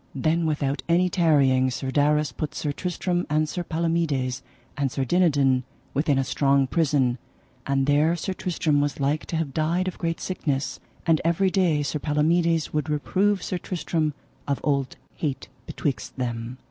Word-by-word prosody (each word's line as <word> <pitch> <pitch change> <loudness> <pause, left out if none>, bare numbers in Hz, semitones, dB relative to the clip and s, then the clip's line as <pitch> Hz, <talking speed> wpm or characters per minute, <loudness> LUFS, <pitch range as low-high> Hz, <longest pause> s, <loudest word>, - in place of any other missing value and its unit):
Then 160 +5 +1
without 145 -3 -1
any 180 +2 +4
tarrying 140 -7 +3
Sir 130 +1 -3
Darras 150 0 +2
put 155 -1 -4
Sir 150 - -2
Tristram, 175 +2 -2
and 155 +1 +2
Sir 175 +3 -3
Palomides, 160 -7 -1 0.3
and 140 -3 -1
Sir 135 - -1
Dinadan, 140 -5 +3 0.3
within 145 0 +2
a 135 - +2
strong 140 0 +2
prison, 135 -5 +1 0.5
and 135 -1 +2
there 150 +4 +3
Sir 185 +3 -3
Tristram 160 -5 0
was 145 0 -1
like 145 +3 0
to - - -3
have 160 -4 -2
died 170 +5 0
of 185 - -4
great 165 -1 -1
sickness; 145 -7 -2 0.3
and 165 -3 +3
every 170 +3 +2
day 175 -6 +2
Sir 145 +2 -2
Palomides 160 +3 +1
would 150 0 -1
reprove 190 +6 +1
Sir 180 - -2
Tristram 165 -4 -2 0.3
of 140 -1 0
old 140 -3 0 0.2
hate 145 -4 -3 0.2
betwixt 135 -5 -3
them. 120 0 -3
150 Hz, 160 wpm, -25 LUFS, 140-170 Hz, 0.5 s, any